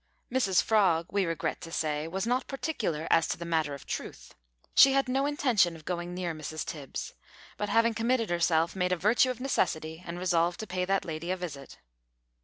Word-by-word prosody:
Mrs 220 -8 +3
Frog, 185 -7 +3
we 200 -1 +1
regret 165 -2 -2
to 165 - -8
say, 155 -1 -1
was 190 +4 -3
not 250 +2 0
particular 225 - -2
as 165 - +4
to - - -2
the 170 - -6
matter 160 -4 0
of 140 - -12
truth. - - -6 0.4
She 270 - +8
had 275 -1 +2
no 270 +2 +1
intention 245 - +2
of 155 -1 -14
going 175 0 -3
near 180 -2 -2
Mrs 155 0 -5
Tibbs, 145 -4 -6 0.4
but, 210 - -3
having 230 0 +3
committed 230 -1 0
herself, 170 0 +2
made 180 -1 0
a 180 - +2
virtue 215 +8 +3
of 250 -2 -3
necessity, 160 -11 -1
and 170 0 -6
resolved 175 -1 +1
to - - -4
pay 180 -2 -2
that 195 0 0
lady 165 +1 -5
a 185 - 0
visit. 150 -7 -7
180 Hz, 200 wpm, -29 LUFS, 165-225 Hz, 0.4 s, She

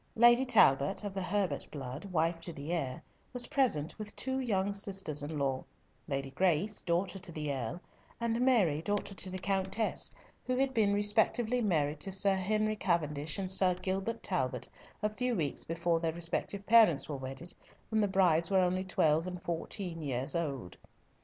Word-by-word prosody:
Lady 240 +3 +6
Talbot, 195 - +4
of 205 -2 -4
the 195 - -3
Herbert 195 +1 -1
blood, 135 +3 -6
wife 165 -2 0
to 170 - -3
the 145 +1 -6
heir, 135 -7 -3 0.3
was 245 -1 +1
present 245 - 0
with 210 -1 -6
two 265 0 -1
young 200 -6 0
sisters 195 -7 +1
in 150 +2 -4
law, 135 -2 -1 0.4
Lady 135 -1 -3
Grace, 185 +5 +1
daughter 180 +3 -1
to 180 -1 -7
the 150 -3 -3
Earl, 130 +5 -4 0.4
and 235 0 0
Mary, 205 - +3
daughter 205 +3 -2
to 185 0 -3
the 185 - -5
Countess, 195 +3 -1 0.3
who 255 - -1
had 265 0 +1
been 215 -4 +3
respectively 220 +4 +2
married 155 -8 +1
to 195 - -3
Sir 195 +1 +3
Henry 215 +3 0
Cavendish 155 -5 -1
and 190 -2 -2
Sir 185 -1 +4
Gilbert 190 +5 -3
Talbot, - - -2 0.4
a 210 - +2
few 250 +1 -1
weeks 155 -7 -2
before 165 0 0
their 165 -1 -1
respective 170 +4 -2
parents 215 -10 +5
were 150 - -4
wedded, 135 +6 -7 0.4
when 220 -1 +2
the 205 - +3
brides 175 -4 +3
were 195 - +3
only 185 +1 +1
twelve 165 -2 +2
and 180 -1 -5
fourteen 170 0 -4
years 135 -2 -2
old. 140 - -3
185 Hz, 175 wpm, -32 LUFS, 155-205 Hz, 0.4 s, Lady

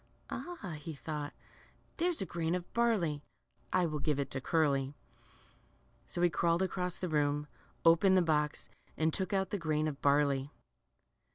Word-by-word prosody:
Ah,'' 210 - -5
he 155 +1 -6
thought, 150 0 -4 0.7
there's 340 - +1
a - - -4
grain 170 -1 -1
of 175 -1 -6
barley; 205 -11 +2 0.5
I 180 - +3
will 155 -2 -2
give 145 0 0
it 140 - -2
to 135 - -3
Curly." 140 -3 +1 1.1
So 175 - -2
he 175 - +6
crawled 170 +2 +2
across 180 -2 -2
the 180 - -3
room, 150 -2 +1 0.4
opened 180 +3 +6
the 185 - +5
box, 150 -2 0 0.3
and 160 0 +2
took 190 -3 -1
out 195 -1 0
the 205 - -1
grain 155 -2 0
of 145 -2 -5
barley. 140 -1 +3
160 Hz, 160 wpm, -33 LUFS, 150-180 Hz, 1.1 s, he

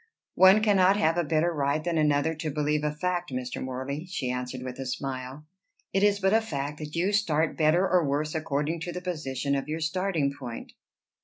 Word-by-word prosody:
"One 190 +3 +6
cannot 195 -2 +4
have 165 -6 +2
a 175 - +1
better 160 +2 +1
right 145 0 0
than 170 -1 0
another 150 +1 +2
to 155 0 -4
believe 150 0 0
a 150 - +1
fact, 175 +2 -2
Mr. 125 -1 -4
Morley," 130 +5 -4
she 140 -9 -3
answered 125 0 -4
with 130 0 -7
a 135 - -4
smile. 130 +2 -5 0.5
"It 195 - +2
is 205 0 +3
but 190 +1 +2
a 225 - +5
fact 150 -7 -4
that 150 0 -7
you 180 +4 +1
start 165 -7 +1
better 165 +4 +3
or 180 -2 +3
worse 150 +2 -1
according 155 +1 -1
to 175 +2 -4
the 180 - -5
position 140 -6 -3
of 140 0 -1
your 155 +1 -3
starting 165 -3 0
point." 125 -5 -8
155 Hz, 205 wpm, -27 LUFS, 140-180 Hz, 0.5 s, One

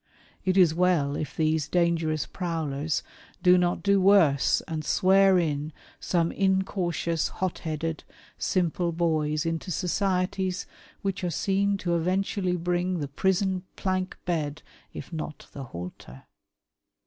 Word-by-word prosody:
It 185 0 +1
is 175 -4 +6
well 165 -5 +2
if 150 -2 -4
these 155 -1 +1
dangerous 165 -5 +1
prowlers 160 -3 -2 0.4
do 180 -1 +7
not 175 -1 +1
do 200 -1 +3
worse 180 -8 +4
and 155 -1 -3
"swear 190 +2 +4
in" 150 -3 -1 0.3
some 170 -2 0
incautious, 190 -4 0
hot 185 -2 -3
headed, 160 0 -3 0.3
simple 175 -1 0
boys 155 -2 0
into 165 +3 -2
societies 185 +1 -1 0.4
which 195 -2 -2
are 180 - 0
seen 200 +4 +1
to 175 -2 -1
eventually 185 +1 0
brinsf 175 +1 -1
the 145 - -3
prison 190 +4 +1
plank 185 -1 -2
bed 155 -4 -2 0.3
if - - -9
not 155 -1 -6
the 135 -2 -7
halter. 85 - -9
175 Hz, 125 wpm, -27 LUFS, 155-185 Hz, 0.4 s, do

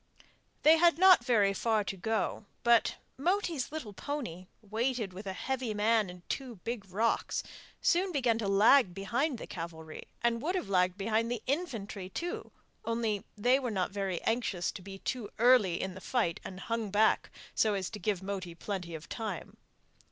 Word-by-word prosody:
They 315 +2 +8
had 340 -1 +5
not 370 -7 +7
very 210 -6 +3
far 220 +1 +1
to 195 - -4
go, 220 +2 -1 0.2
but 235 -1 +4 0.2
Moti's 340 -4 0
little 300 -10 -6
pony, 190 - -5 0.2
weighted 225 -1 -1
with 195 +2 -8
a 190 - -2
heavy 250 0 -2
man 215 -1 +3
and 180 -1 -12
two 260 -4 -4
big 230 -4 -4
rocks, 225 +5 0 0.4
soon 365 +2 +2
began 245 -7 +1
to 210 - -1
lag 200 0 +5
behind 245 +9 0
the - - -7
cavalry, 160 -3 -7 0.2
and 235 -1 +2
would 350 +7 -1
have 365 - -2
lagged 185 -1 +2
behind 220 +3 0
the 240 -2 -3
infantry 225 - -3
too, 345 - -4 0.3
only 230 -3 -1
they 245 +5 +4
were 255 -3 -2
not 190 -5 -1
very 195 -3 -2
anxious 225 -6 0
to - - -9
be 195 +1 -9
too 225 +1 -4
early 225 -7 +5
in 190 -1 -3
the 190 - -10
fight, 225 -10 0
and 190 0 -8
hung 230 -2 -2
back 210 +2 +3 0.2
so 215 -2 +2
as 190 -2 -3
to 210 - -6
give 205 -4 -1
Moti 190 -3 -4
plenty 180 -3 -4
of 160 +1 -9
time. 215 -7 -5
220 Hz, 175 wpm, -31 LUFS, 195-245 Hz, 0.4 s, They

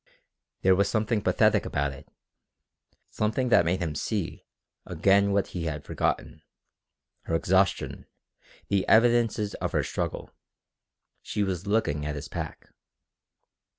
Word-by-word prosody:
There 95 - +6
was 100 +1 +2
something 110 0 0
pathetic 105 +1 +3
about 70 -1 -1
it, 70 - -14 1.0
something 110 +4 0
that 85 - +5
made 90 +2 0
him 80 -3 -2
see 100 +4 -3 0.4
again 100 +1 +2
what 100 0 +1
he 85 -2 -4
had 75 -2 -4
forgotten 75 +2 -2 0.8
her 80 - -1
exhaustion, 95 +3 +1 0.6
the 100 -1 +1
evidences 115 -2 +3
of - - -2
her - - +2
struggle. - - -4 0.9
She 105 - -2
was 95 -1 -3
looking 100 -9 0
at 75 0 -3
his 70 - -7
pack. - - -6
100 Hz, 125 wpm, -27 LUFS, 80-105 Hz, 1.0 s, There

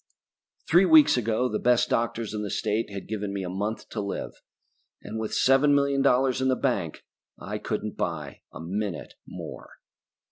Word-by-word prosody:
Three 175 +4 +5
weeks 160 -4 +7
ago 120 +1 0
the - - -2
best 125 -1 +3
doctors 115 -1 -1
in 105 - -3
the 105 - -4
state 105 +4 -1
had 100 -1 -7
given 105 -2 -3
me 100 -1 -3
a 90 - -4
month 105 +4 -3
to 105 - -4
live. 100 -1 -4 0.7
And 110 - -5
with 110 -1 -3
seven 135 +2 +4
million 140 -1 +2
dollars 130 -1 +2
in 130 - +1
the 130 - +3
bank 100 - -2 0.3
I - - -5
couldn't - - -4
buy - - -4
a - - -10
minute 95 +2 -4
more. - - -9
115 Hz, 175 wpm, -26 LUFS, 105-130 Hz, 0.7 s, weeks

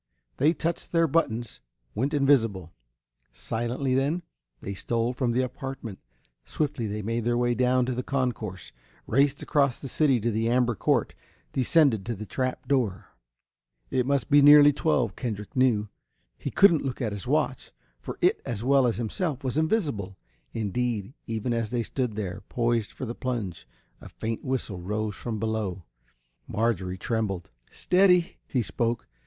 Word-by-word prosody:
They 150 +4 +4
touched 170 0 -3
their 165 -1 +4
buttons, 120 - -1 0.3
went 135 +8 -1
invisible. 115 - +2 0.6
Silently, 120 +4 -2
then, 145 +7 +1 0.4
they 100 - -5
stole 115 +4 -1
from 125 -1 0
the 125 +2 +1
apartment. 130 -5 -6 0.4
Swiftly 125 - -2
they 105 +1 -4
made 115 +2 -1
their 120 +1 +1
way 120 0 +2
down 125 +1 +2
to 130 - -1
the 125 - -2
concourse, 125 -8 -3 0.3
raced 140 +4 +2
across 140 -3 +2
the 135 - -6
city 135 -2 +2
to 115 +2 0
the 115 +1 0
amber 120 0 +2
court, 105 - +1 0.4
descended 130 - +3
to 120 - -2
the 110 +2 -7
trap 130 +3 -3
door. 120 -9 -1 0.8
It 125 -1 +1
must 140 +1 0
be 145 0 +7
nearly 145 0 +8
twelve, 130 - +1
Kendrick 110 +1 -5
knew. 120 -5 +3 0.5
He - - -5
couldn't 170 -6 +5
look 130 -3 -3
at 115 -5 -1
his 100 -3 -6
watch, - - 0 0.3
for - - -7
it - - +3
as 115 -2 -4
well 135 0 +4
as 115 - 0
himself 135 - -2
was 130 -1 -2
invisible. 145 - 0 0.3
Indeed, 115 +1 -2
even 115 +1 -2
as 115 -2 -1
they 120 0 -1
stood 125 -2 -2
there, 100 -2 -4
poised 115 -3 0
for - - -6
the 120 - -4
plunge, 115 -9 -4 0.3
a - - -10
faint 115 0 -4
whistle 125 -8 -3
rose 105 +3 -2
from 115 -3 -4
below. 105 -5 -2 0.6
Marjorie 95 -4 -1
trembled. 105 - -2 0.2
"Steady!" 180 -1 +3
he 125 -3 0
spoke. 115 +2 -2
120 Hz, 160 wpm, -27 LUFS, 110-135 Hz, 0.8 s, nearly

